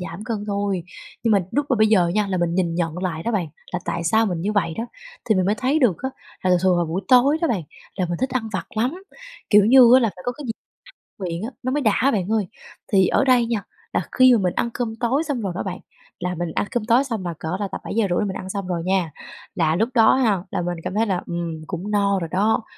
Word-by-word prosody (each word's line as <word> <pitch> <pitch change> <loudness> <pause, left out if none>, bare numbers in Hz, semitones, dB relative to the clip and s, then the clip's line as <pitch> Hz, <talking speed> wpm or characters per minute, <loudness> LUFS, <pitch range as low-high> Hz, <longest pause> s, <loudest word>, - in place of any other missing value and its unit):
giảm 175 +4 -7
cân 215 -3 -3
thôi. 200 -3 -1 0.4
Nhưng 225 -2 +2
mà 200 - +5
lúc 285 +3 0
mà 255 - +2
bây 215 - +4
giờ 190 -6 +4
nha 210 +3 +1
là 190 - -2
mình 170 -1 0
nhìn 175 -2 0
nhận 170 0 -2
lại 170 -4 -3
đó 235 - -2
bạn, 180 -7 -1 0.2
là 180 - 0
tại 170 - -3
sao 220 +6 +3
mình 175 -4 -2
như 205 +4 -1
vậy 185 -6 0
đó, 230 - -2 0.4
thì 220 - +2
mình 185 -1 +1
mới 205 - +2
thấy 270 +6 +1
được 235 - +3
á, 265 - -1 0.3
là 185 - +1
thường 180 - +5
thường 185 -2 +4
vào 175 - +1
buổi 165 +4 -2
tối 265 +5 +5
đó 330 - +2
bạn, 200 - 0 0.3
là 185 -2 0
mình 175 - -3
thích 260 +1 0
ăn 250 -4 -2
vặt 190 - -3
lắm, 265 +12 -1 0.5
kiểu 210 -1 +7
như 245 +1 +7
á 260 - +7
là 230 - +2
phải 180 - -11
có 245 - 0
cái 290 +3 -10
gì 225 - -1 0.7
miệng 175 0 -4
á, 230 - -3
nó 255 - -1
mới 290 +2 0
đã 235 +4 +2
bạn 200 -2 -1
ơi. 215 -4 +1 0.4
Thì 190 -3 +4
ở - - +2
đây 250 -3 +4
nha, 230 -3 -2 0.3
là - - +1
khi 255 -1 +6
mà 230 - +4
mình 180 -3 0
ăn 235 - 0
cơm 230 -3 -3
tối 260 +5 +1
xong 285 -7 -3
rồi 195 -4 -3
đó - - -3
bạn, 185 -2 -5 0.4
là 180 0 -2
mình 175 -1 -3
ăn - - +1
cơm 240 -3 -1
tối 240 +4 +4
xong 225 -9 -4
là 170 - -2
cỡ 160 +4 -3
là 205 - -1
tầm - - -5
7:30 200 -5 0
là 210 - 0
mình 190 - -4
ăn 185 - -6
xong 195 -1 -4
rồi 175 -2 -2
nha, 185 -3 0 0.4
là 160 -2 +2
lúc 225 +6 +1
đó 225 -3 +5
ha, 215 -9 +1
là - - -1
mình 175 0 -3
cảm 185 +1 -4
thấy 220 +2 +2
là, 185 -3 0
ừm, 170 -2 -4
cũng 190 +3 -5
no 200 -1 +2
rồi 165 -2 -5
đó, 210 +4 +2
200 Hz, 275 wpm, -22 LUFS, 180-235 Hz, 0.7 s, kiểu